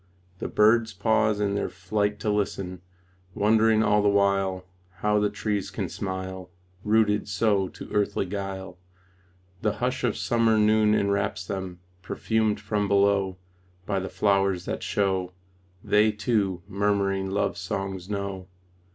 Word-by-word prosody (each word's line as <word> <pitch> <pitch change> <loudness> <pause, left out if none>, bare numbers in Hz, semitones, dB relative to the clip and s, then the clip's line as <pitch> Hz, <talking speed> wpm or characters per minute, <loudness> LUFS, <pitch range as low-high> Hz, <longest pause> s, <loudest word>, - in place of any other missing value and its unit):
The - - -3
birds 110 +1 +3
pause 110 +2 +2
in 100 -1 0
their 100 - -1
flight 105 +3 -2
to 105 - 0
listen, 95 -3 -2 0.5
Wondering 110 +1 +4
all 105 0 +3
the 105 - +3
while 100 -2 +1 0.4
How 105 0 +2
the 105 0 +2
trees 105 -1 -2
can - - -4
smile 95 -1 -5 0.3
Rooted 105 -1 +2
so 100 -1 +1
to - - -10
earthly 105 -1 0
guile. 95 -2 -6 0.8
The 105 -1 +1
hush 125 +1 -2
of 120 -4 0
summer 115 -2 +2
noon 105 0 +4
enwraps 100 -3 0
them 95 -2 -5 0.2
Perfumed 110 +1 0
from 105 0 -1
below 100 -1 +2 0.5
By 100 0 0
the 95 - -5
flowers 95 -3 +1
that - - -3
show 95 -2 -1 0.5
They, 105 +1 +4
too, 105 -5 -1
murmuring 100 -1 0
love 100 +2 0
songs 95 -1 -4
know. 100 -2 -4
100 Hz, 135 wpm, -26 LUFS, 95-105 Hz, 0.8 s, Wondering